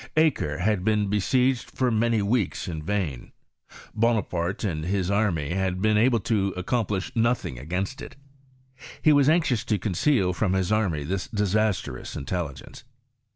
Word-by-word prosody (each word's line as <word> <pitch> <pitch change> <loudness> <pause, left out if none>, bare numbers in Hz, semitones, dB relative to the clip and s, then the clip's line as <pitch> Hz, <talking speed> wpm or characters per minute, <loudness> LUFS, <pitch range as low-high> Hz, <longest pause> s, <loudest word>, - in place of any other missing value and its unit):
Acre 145 - +2
had 100 0 0
been 105 -1 +1
besieged 125 +5 +1
for 130 -2 0
many 115 -1 +2
weeks 105 -2 0
in 80 -3 -4
vain. 85 -7 -3 0.6
Bonaparte 105 -6 0
and 80 -7 -2
his 95 +1 -1
army 90 -8 0
had 95 -1 -1
been 110 +2 +2
able 115 +2 +3
to 100 -3 0
accomplish 100 0 -1
nothing 115 - 0
against 90 - -3
it: - - -9 0.9
he 155 - +6
was 145 0 +4
anxious 150 -9 +2
to 110 -3 +1
conceal 100 - +1
from 95 +1 0
his 95 0 0
army 95 -9 +1
this 95 +5 -3
disastrous 105 - -1
intelligence. 75 - -5
100 Hz, 145 wpm, -25 LUFS, 90-115 Hz, 0.9 s, he